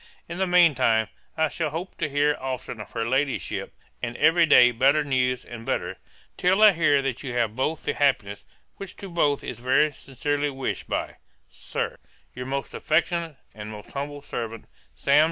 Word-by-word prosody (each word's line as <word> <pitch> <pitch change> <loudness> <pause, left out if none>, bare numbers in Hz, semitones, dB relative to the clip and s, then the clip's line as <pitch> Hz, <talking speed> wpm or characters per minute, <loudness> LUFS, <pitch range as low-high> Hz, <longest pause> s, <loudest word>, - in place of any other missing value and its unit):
In 170 +2 -6
the 190 - +1
mean 175 -3 +6
time 110 -3 +2 0.3
I 160 0 +3
shall 155 +1 -2
hope 165 +5 -6
to 155 -3 -1
hear 145 +1 +2
often 130 -4 -5
of - - -10
her 115 -1 -1
Ladyship, 135 +2 -1 0.3
and 120 0 -4
every 165 +1 +5
day 125 -4 +7
better 135 +6 +3
news 125 -3 0
and 120 -2 -9
better, 90 -4 -2 0.4
till 190 +4 +3
I 215 - +10
hear 155 -5 +3
that 135 -2 -2
you 130 -4 -5
have 115 -3 0
both 150 +5 -1
the - - -1
happiness, 120 -8 0 0.3
which 195 -2 -8
to 195 - -9
both 150 -5 +1
is 120 - -6
very 130 +5 +3
sincerely 145 +2 -2
wished, 135 -1 -4
by, - - -3 0.3
Sir, - - -4 0.4
'Your 125 0 -6
most 140 +1 -3
affectionate, 165 0 0 0.2
and 105 0 -8
'Most 105 -1 -10
humble 145 +1 -5
servant, 115 -4 -5 0.3
'SAM. 140 +1 +3
140 Hz, 180 wpm, -25 LUFS, 120-155 Hz, 0.4 s, I